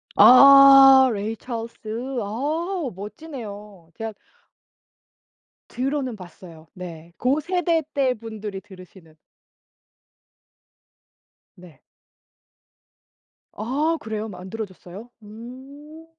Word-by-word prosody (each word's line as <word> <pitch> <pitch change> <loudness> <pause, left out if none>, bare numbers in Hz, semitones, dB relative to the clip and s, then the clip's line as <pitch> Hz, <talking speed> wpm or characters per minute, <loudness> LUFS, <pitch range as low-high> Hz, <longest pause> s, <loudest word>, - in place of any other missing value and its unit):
아 275 0 +8
Ray 215 0 -4
Charles. 235 -2 -7 0.5
아 300 - -3
멋지네요. 210 - -10
제가 225 0 -6 1.6
들어는 260 -1 -3
봤어요. 175 -4 -14
네. 170 -2 -11
고 260 +5 0
세대 335 0 -1
때 265 -3 0
분들이 215 -3 -8
들으시는. 185 -4 -17 2.4
네. 175 -6 -17 1.7
아 290 +9 -2
그래요? 220 -2 -5
만들어졌어요? 190 +2 -9
음. 265 +8 -13
225 Hz, 180 characters per minute, -22 LUFS, 195-275 Hz, 2.4 s, 아